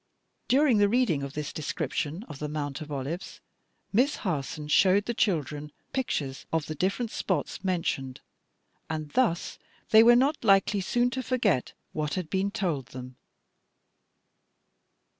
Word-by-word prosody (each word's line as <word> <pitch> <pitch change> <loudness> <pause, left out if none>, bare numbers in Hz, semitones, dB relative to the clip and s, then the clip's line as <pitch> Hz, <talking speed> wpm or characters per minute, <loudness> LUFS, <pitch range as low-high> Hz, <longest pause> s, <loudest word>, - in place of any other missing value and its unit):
'" - - -49
During 265 -4 +4
the 205 0 +4
reading 220 - +2
of 140 0 -5
this 150 -1 -4
description 155 - -3
of 145 - -10
the 150 - -3
Mount 145 -2 -4
of 155 -1 -8
Olives, 145 +6 -5 0.5
Miss 255 +8 +3
Harson 150 - -3
showed 190 +6 +4
the 240 - -1
children 150 - -1 0.2
pictures 145 - -2
of 160 -2 0
the 155 - -4
different 195 - -1
spots 180 0 -2
mentioned, 165 -8 -1 0.7
and 155 -2 -4
thus 230 -10 0 0.3
they 220 - +9
were 240 +1 +7
not 275 +4 +2
likely 195 -1 +4
soon 240 +6 +1
to 260 - -2
forget 225 - 0 0.2
what 150 +1 -2
had 180 -4 -4
been 190 +1 +1
told 175 - -2
them. 125 0 -9
175 Hz, 145 wpm, -28 LUFS, 150-220 Hz, 0.7 s, they